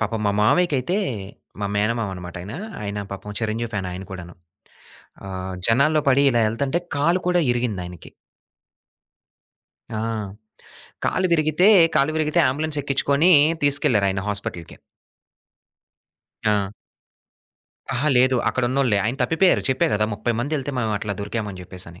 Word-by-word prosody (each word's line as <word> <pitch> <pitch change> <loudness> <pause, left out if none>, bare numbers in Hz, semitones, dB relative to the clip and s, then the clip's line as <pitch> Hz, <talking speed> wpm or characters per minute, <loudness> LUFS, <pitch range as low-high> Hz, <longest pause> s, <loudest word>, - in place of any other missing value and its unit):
పాపం 110 0 -1
మా - - +3
మామయ్యకైతే 150 - +2 0.6
మా 100 - -1
మేనమామన్నమాట 100 -5 -2
ఆయన. 105 +4 -8 0.3
ఆయన 100 0 -4
పాపం 105 +1 -7
చిరంజీవి 115 +1 -2
ఫ్యాన్ 95 -3 -3
ఆయన 95 +2 -7
కూడాను. 90 -2 -8 0.9
ఆహ్, 95 0 -5
జనాల్లో 140 +7 +3
పడి 135 +1 +4
ఇలా 120 -1 +2
ఎళ్తుంటే 135 +8 -1 0.2
కాలు 170 +6 +2
కూడా 180 -1 +3
ఇరిగిందాయనకి. 100 -8 -3 1.9
ఆ! - - -2 1.1
కాలు 185 0 +1
విరిగితే 155 +3 +3 0.3
కాలు 145 +1 +3
విరిగితే 155 -1 +1
ఆంబులెన్స్ 150 +2 -1
ఎక్కించుకొని 140 +5 +2 0.3
తీసుకెళ్లారు 130 -7 +2
ఆయనా 95 0 -2
హాస్పిటల్‌కి. 90 -5 -4 1.7
ఆ! 100 -2 +1 1.2
అహా! 150 +5 0
లేదు 130 +1 +4
అక్కడున్నోల్లే. 130 -3 +1
ఆయన 120 +5 -1
తప్పిపోయారు. 165 +8 +3
చెప్పా 130 - +2
కదా! 105 +1 +2
30 110 +3 -1
మందేళ్తే 145 +1 -2
మేము 110 -3 0
అట్లా 105 -1 -3
దొరికాం 105 +1 -3
అని 95 -2 -9
చెప్పేసని. 90 -1 -10
115 Hz, 125 wpm, -22 LUFS, 100-140 Hz, 1.9 s, పడి